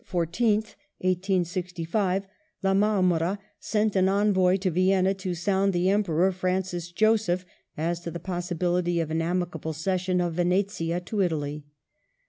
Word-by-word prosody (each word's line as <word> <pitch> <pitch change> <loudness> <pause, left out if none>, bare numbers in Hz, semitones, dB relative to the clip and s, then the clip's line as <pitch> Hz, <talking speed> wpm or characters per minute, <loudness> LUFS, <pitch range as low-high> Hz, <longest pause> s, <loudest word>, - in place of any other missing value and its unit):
14th, 210 +5 0 0.3
1865), 185 +1 0 0.4
La 195 0 +3
Marmora 190 -3 +2 0.2
sent 215 -1 0
an 190 0 +4
envoy 195 -2 +3
to 185 -1 -1
Vienna 185 +2 +3
to 190 -2 -4
sound 195 +3 +1
the 180 +2 +2
Emperor 190 -3 +2
Francis 185 -2 -2
eloseph 210 -3 +2 0.3
as 170 +2 -1
to 175 - -6
the 170 - -6
possibility 175 0 -1
of 160 -2 -2
an 160 +1 0
amicable 170 -2 -2
cession 185 +3 0
of 175 -1 0
Venetia 175 -1 0
to 200 +3 -2
Italy. 150 -4 -2
180 Hz, 130 wpm, -26 LUFS, 175-195 Hz, 0.4 s, an